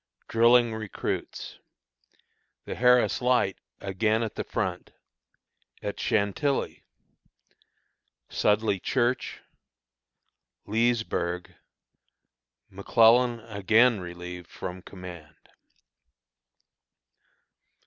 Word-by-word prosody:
Drilling 120 0 +4
Recruits. 110 -2 -5 1.1
The - - -4
Harris 125 0 +3
Light 125 -6 +2 0.2
again 110 +3 0
at 110 - -4
the - - -4
Front. - - -4 0.9
At 100 - -4
Chantilly. 110 +7 0 1.4
Sudley 105 -2 +1
Church. 125 +4 -1 1.2
Leesburg. 110 -6 -1 1.2
McClellan 115 +4 +4
again 110 +2 +3
Relieved 90 0 -8
from 90 0 -7
Command. 85 -5 -11
110 Hz, 65 wpm, -27 LUFS, 95-120 Hz, 1.4 s, Drilling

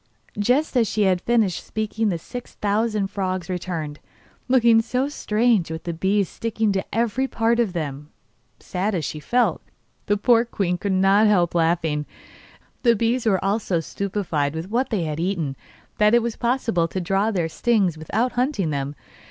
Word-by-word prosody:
Just 255 +8 +1
as 235 -3 +3
she 215 - 0
had 185 -2 +2
finished 225 -5 +1
speaking 220 0 -2
the 175 - -1
six 245 +9 -9
thousand 210 -1 0
frogs 185 -3 -2
returned, 165 -5 -4 0.5
looking 235 -3 +5
so 250 +4 -1
strange 220 - +1
with 160 +1 -5 0.2
bees 195 +1 +2
sticking 225 +1 -1
to 190 -1 0
every 235 +4 0
part 230 -1 +1
of 220 -6 +1
them 150 -3 -4 0.5
that, - - -24
sad 195 +3 -1
as 165 -5 -2
she 155 - -4
felt, 240 - +1 0.5
the 205 - +2
poor 230 +2 +4
queen 185 -6 -2
could 200 - -2
not 195 +3 +4
help 180 -5 +3
laughing. 165 -3 +1 0.7
The 235 -2 +4
bees 230 +2 0
were 190 -3 +2
all 200 +3 +2
so 185 -5 -1
stupefied 165 -5 -2
with 165 +5 -5
what 250 +4 +1
they 210 -7 0
had 155 -1 -3
eaten 170 -6 -1 0.4
that 210 +2 +5
it 240 - +3
was 235 -1 -2
possible 235 -8 0
to 185 - -4
draw 195 +4 +1
their 180 -7 0
stings 195 -1 +1
without 215 +11 -1
hunting 245 - 0
them. 140 0 -3
200 Hz, 175 wpm, -23 LUFS, 175-230 Hz, 0.7 s, looking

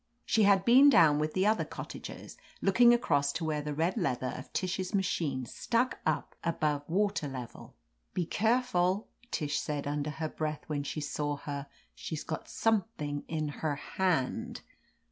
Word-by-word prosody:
She 220 - +2
had 195 -1 +4
been 265 +4 +8
down 155 - +6
with 155 0 -1
the 190 +1 +2
other 215 +1 +3
cottagers, - - -8 0.2
looking 235 +5 +6
across 145 -12 +2
to 165 - -3
where 155 -1 -1
the 150 0 -4
red 165 +7 0
leather 130 - -1
of 130 - -9
Tish's 185 +1 -2
ma 195 - +2
chine 140 -8 -1
stuck 240 - -1
up - - -1
above 150 -3 -1
water 195 -3 +1
level. 130 -4 -8 0.4
"Be 175 - 0
careful," 210 -2 +1 0.2
Tish 150 -8 -1
said 145 -2 -3
under 145 +1 -2
her 155 +2 -3
breath 155 -1 -3
when 150 -2 -2
she 150 +2 -4
saw 145 0 -2
her; 140 0 -5 0.3
"she's 155 -1 -5
got 160 - -5
something' 195 -10 -1
in 155 -2 -2
her 155 -2 0
hand 160 -3 -1
160 Hz, 165 wpm, -31 LUFS, 145-195 Hz, 0.4 s, been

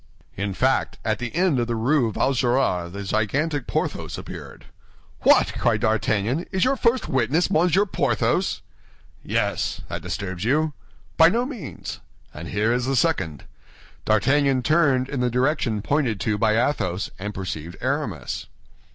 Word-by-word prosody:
In 100 0 -3
fact, 130 +4 +1
at 110 0 0
the 120 +1 -5
end 175 -6 +2
of 120 - 0
the 120 - -1
Rue 120 +1 +2
Vaugirard 120 -9 +1
the 100 +2 -6
gigantic 135 +9 -1
Porthos - - -2
appeared. - - -9 0.6
"What!" - - +5
cried - - +2
D'Artagnan, 110 - 0
"is 190 -2 +1
your 265 +1 +2
first 240 -1 +1
witness 135 +7 +1
Monsieur 180 +5 +3
Porthos?" 195 - 0 0.6
"Yes, - - -1
that - - -4
disturbs 95 -2 -4
you?" 150 +6 +1 0.4
"By 165 0 +8
no 235 +6 +1
means." 255 -6 -7 0.3
"And 80 +2 -7
here 105 +5 +1
is 125 0 -1
the 135 - +1
second." 80 - 0 0.6
D'Artagnan 135 +5 +2
turned 140 -4 +3
in 140 -1 -4
the 125 0 +1
direction 125 -4 0
pointed 130 -8 0
to 110 - 0
by 110 +1 +2
Athos, 100 -7 0
and 105 +2 -4
perceived 90 -3 -6
Aramis. 130 - -3
125 Hz, 145 wpm, -23 LUFS, 105-150 Hz, 0.6 s, By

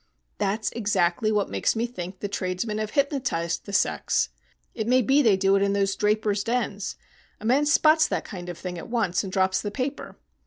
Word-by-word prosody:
"That's 210 +2 0
exactly 205 -2 +1
what 210 -2 0
makes - - +1
me 225 +1 0
think 185 -6 -7
the 205 - -2
tradesmen 200 +2 -2
have 215 -1 -2
hypnotised 250 - -1
the - - -6
sex. 200 - +1 0.4
It 220 -1 -3
may 255 +1 +4
be 275 +6 +4
they 220 -7 +4
do 195 0 +3
it 195 - +2
in 200 0 +2
those 195 -1 +1
drapers' 210 -1 +1
dens. 230 -4 -2 0.4
A 215 - -9
man 275 +6 +3
spots 310 +1 +5
that - - -2
kind 180 -3 -7
of 175 - -6
thing 180 -1 -6
at - - -9
once 215 -7 0
and 190 - -6
drops 190 0 +1
the 205 - -3
paper. 265 +6 -4
210 Hz, 200 wpm, -25 LUFS, 190-235 Hz, 0.4 s, spots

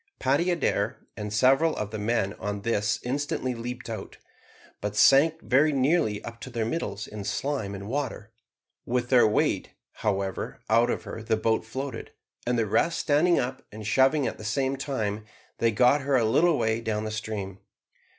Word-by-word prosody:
Paddy 140 +7 +1
Adair 175 -2 -1
and 105 0 -5
several 135 +9 +4
of 105 -1 -3
the 110 - -4
men 105 -2 0
on 105 0 -3
this 105 -2 +1
instantly 130 0 -2
leaped 125 +2 -6
out, 110 -4 -7 0.6
but 105 0 -3
sank 155 +8 +5
very 140 +4 +4
nearly 135 -6 +1
up 115 0 -9
to - - -7
their 115 -3 -2
middles 110 -6 -3
in 105 -1 -7
slime 105 0 -2
and 100 +1 -7
water. 125 -4 -3 0.5
With 120 0 -1
their 120 -4 +6
weight, 105 - 0 0.2
however, 100 -2 -2
out 115 +2 +4
of - - -2
her 115 - -7
the 110 0 0
boat 110 0 +1
floated, 130 +2 -6 0.3
and 125 0 +1
the 115 - +2
rest 165 +11 +1
standing 165 +4 +3
up 130 +1 -2
and 110 0 -8
shoving 135 +6 +3
at - - -3
the - - -8
same 130 +5 0
time, 110 -7 -3 0.4
they 115 - +3
got 125 +6 +4
her 140 0 +1
a 120 -3 +3
little 160 +8 +3
way 110 0 0
down 110 -2 -2
the 110 - -4
stream. 105 -3 -5
115 Hz, 180 wpm, -27 LUFS, 105-135 Hz, 0.6 s, their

